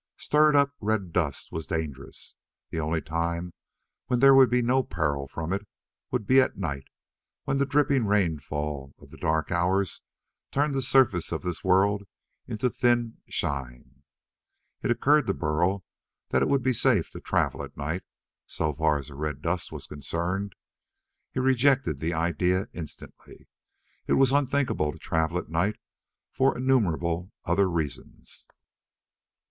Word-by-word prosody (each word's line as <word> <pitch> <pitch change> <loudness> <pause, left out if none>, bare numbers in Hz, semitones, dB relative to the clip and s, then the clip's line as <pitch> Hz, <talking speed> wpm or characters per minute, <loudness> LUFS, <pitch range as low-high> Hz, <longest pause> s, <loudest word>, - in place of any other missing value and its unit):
Stirred 150 0 +3
up 140 0 +4
red 100 -5 -1
dust 80 -6 -1
was 80 -1 -5
dangerous. 80 -6 -5 0.4
The 80 - -2
only 80 +1 -1
time 85 +2 -2 0.5
when 125 -1 +1
there 135 +1 +8
would 135 -1 +7
be 125 0 +2
no 130 +3 +3
peril 75 - -2
from 80 +5 -4
it 100 +1 -3 0.4
would 125 -5 -2
be 130 +5 +6
at 130 - -1
night, 70 -8 -3 0.6
when 135 0 -1
the 140 - +2
dripping 140 -4 +2
rainfall 75 -7 -1
of - - -17
the - - -12
dark 80 +1 0
hours 95 +2 +1 0.5
turned 145 +1 +1
the 135 - 0
surface 125 -9 +3
of 80 - -3
this 90 -2 -4
world 100 +2 +3 0.4
into 110 +3 -1
thin 120 -2 +1
shine. 65 -1 -4 0.8
It - - -2
occurred 140 +3 +3
to 100 - +1
Burl 85 +5 0 0.5
that - - +2
it - - +3
would 140 -2 +2
be 130 - +2
safe 120 -7 +2
to - - -8
travel - - 0
at - - -9
night, 80 +6 -3 0.5
so 80 -2 -1
far 75 0 +2
as 70 0 -7
the - - -10
red 75 0 -4
dust 85 +1 -1
was - - -7
concerned. 85 +7 -3 0.8
He - - -3
rejected 130 - +2
the 80 +2 -1
idea 90 +3 0
instantly. 80 -4 -10 0.6
It - - +2
was 135 -1 +4
unthinkable 140 - +1
to - - -12
travel 80 +1 -1
at 90 - -5
night 90 +6 +1 0.6
for 135 -1 +2
innumerable 90 -8 +1
other 95 +3 +2
reasons. 80 -6 -5
90 Hz, 155 wpm, -27 LUFS, 80-125 Hz, 0.8 s, there